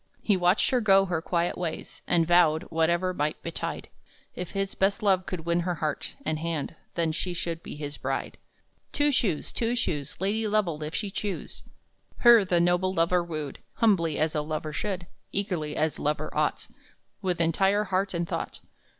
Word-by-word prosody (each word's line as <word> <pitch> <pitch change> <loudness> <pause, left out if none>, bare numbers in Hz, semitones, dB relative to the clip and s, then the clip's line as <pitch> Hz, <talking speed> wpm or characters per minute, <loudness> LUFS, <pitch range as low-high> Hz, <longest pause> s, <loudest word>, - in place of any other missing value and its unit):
He 205 - +3
watched 180 +2 +3
her 250 -2 +3
go 195 -2 +5
her 175 -4 -1
quiet 170 0 0
ways, 170 -3 -5
And 170 -1 +3
vowed, 165 -2 +4
whatever 170 +3 +2
might 150 -2 -1
betide, - - -4 0.5
If 180 - -5
his 195 -1 -2
best 200 +3 +1
love 190 -2 +3
could 180 -3 -3
win 170 +1 +1
her 175 0 -1
heart 155 -1 -3
And 155 -1 -1
hand, 165 -3 -2 0.2
then 165 -2 +1
she 175 +3 -2
should 170 -1 -3
be - - -8
his 145 -1 -5
bride. 135 +1 -3 0.5
Two 290 0 +3
Shoes, 205 - 0
Two 235 +1 0
Shoes 150 - -2
Lady 210 +4 0
Lovell, 200 -8 0
if 155 +1 -4
she 205 -3 -2
choose! 205 -1 -4 0.6
Her 235 -3 +7
the 180 -2 +2
noble 175 +2 +2
lover 175 +1 +3
wooed, 155 -4 -5
Humbly, 170 -9 +2
as 155 0 +1
a 150 - 0
lover 155 0 -4
should, 185 +1 -3 0.3
Eagerly, 175 -7 -2
as 155 0 0
lover 150 +1 -2
ought, - - 0 0.5
With 180 -3 -1
entire 195 +5 +3
heart 190 -1 -1
and 170 0 -1
thought. - - -4
175 Hz, 175 wpm, -27 LUFS, 160-195 Hz, 0.6 s, Her